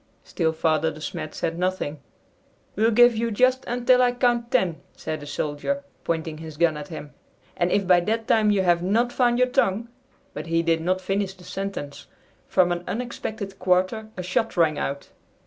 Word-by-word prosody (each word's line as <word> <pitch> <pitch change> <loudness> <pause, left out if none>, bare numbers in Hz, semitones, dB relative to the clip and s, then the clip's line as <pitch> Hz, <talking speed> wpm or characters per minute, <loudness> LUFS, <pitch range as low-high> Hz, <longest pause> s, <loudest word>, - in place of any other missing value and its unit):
Still 160 -3 0
Father 160 0 +1
De 155 -1 -9
Smet 155 0 -5
said 165 +1 -2
nothing. 180 -5 -2 0.8
"We'll 220 +3 +3
give 240 +1 +6
you 230 +1 0
just 255 +4 +2
until 245 +1 +3
I 245 -1 +3
count 240 -1 +1
ten," 185 -11 +1 0.2
said 155 - -4
the 145 - -10
soldier, 150 - -2 0.2
pointing 160 -2 -2
his 160 -2 -9
gun 165 -1 +3
at 150 -1 -7
him, 150 -2 -8 0.4
"and 175 +1 0
if 200 - +2
by 180 -1 +6
that 220 +5 -2
time 215 -2 +4
you 200 -2 +3
have 175 -1 +3
not 230 +7 +1
found 240 -2 +2
your 250 0 +3
tongue 230 -3 +1 0.2
" - - -36
But 150 +2 -6
he 165 0 +1
did 165 -1 +1
not 185 +3 0
finish 195 0 -2
the 180 - -16
sentence. 195 -8 -6 0.4
From 180 -1 +3
an 175 0 -2
unexpected 220 -4 -5
quarter 185 +4 +1
a 180 - -3
shot 190 +4 -1
rang 160 -3 +3
out. 140 +1 -4
185 Hz, 190 wpm, -24 LUFS, 160-230 Hz, 0.8 s, give